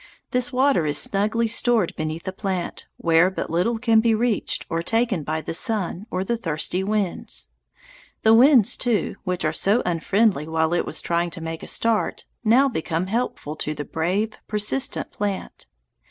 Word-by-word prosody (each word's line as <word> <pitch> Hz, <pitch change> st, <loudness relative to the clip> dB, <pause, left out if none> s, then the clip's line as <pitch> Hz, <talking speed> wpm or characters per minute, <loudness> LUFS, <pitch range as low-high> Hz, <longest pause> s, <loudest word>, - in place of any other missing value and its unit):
This 250 Hz, +2 st, +1 dB
water 260 Hz, -, +2 dB
is 145 Hz, -, +2 dB
snugly 215 Hz, +4 st, +1 dB
stored 230 Hz, -4 st, +2 dB
beneath 155 Hz, +1 st, -4 dB
the 190 Hz, -, -5 dB
plant, 190 Hz, -3 st, -4 dB
where 165 Hz, +2 st, +3 dB
but 190 Hz, -, -5 dB
little 180 Hz, +8 st, +1 dB
can 225 Hz, -1 st, +3 dB
be 225 Hz, 0 st, +3 dB
reached 230 Hz, -2 st, 0 dB
or 165 Hz, -, -2 dB
taken 225 Hz, -1 st, 0 dB
by 155 Hz, +2 st, -3 dB
the -, -, -5 dB
sun 205 Hz, 0 st, 0 dB
or 185 Hz, +1 st, -2 dB
the 235 Hz, +5 st, -1 dB
thirsty 180 Hz, -1 st, -1 dB
winds. 205 Hz, -2 st, -2 dB, 0.7 s
The 220 Hz, -, +6 dB
winds, 245 Hz, -2 st, +6 dB
too, 235 Hz, -4 st, -1 dB
which 180 Hz, -1 st, -1 dB
were 155 Hz, -, 0 dB
so 205 Hz, +8 st, +2 dB
unfriendly 180 Hz, 0 st, +1 dB
while 160 Hz, 0 st, 0 dB
it 175 Hz, -, 0 dB
was -, -, 0 dB
trying 170 Hz, 0 st, 0 dB
to 165 Hz, -, -7 dB
make 165 Hz, 0 st, -5 dB
a -, -, -8 dB
start, 225 Hz, -2 st, 0 dB, 0.2 s
now 245 Hz, +5 st, +5 dB
become 165 Hz, -7 st, -2 dB
helpful 195 Hz, -7 st, -3 dB
to 155 Hz, 0 st, -3 dB
the 145 Hz, -, -5 dB
brave, 190 Hz, +7 st, -2 dB
persistent 210 Hz, +5 st, 0 dB
plant. 200 Hz, -2 st, -4 dB
195 Hz, 170 wpm, -23 LUFS, 165-225 Hz, 0.7 s, The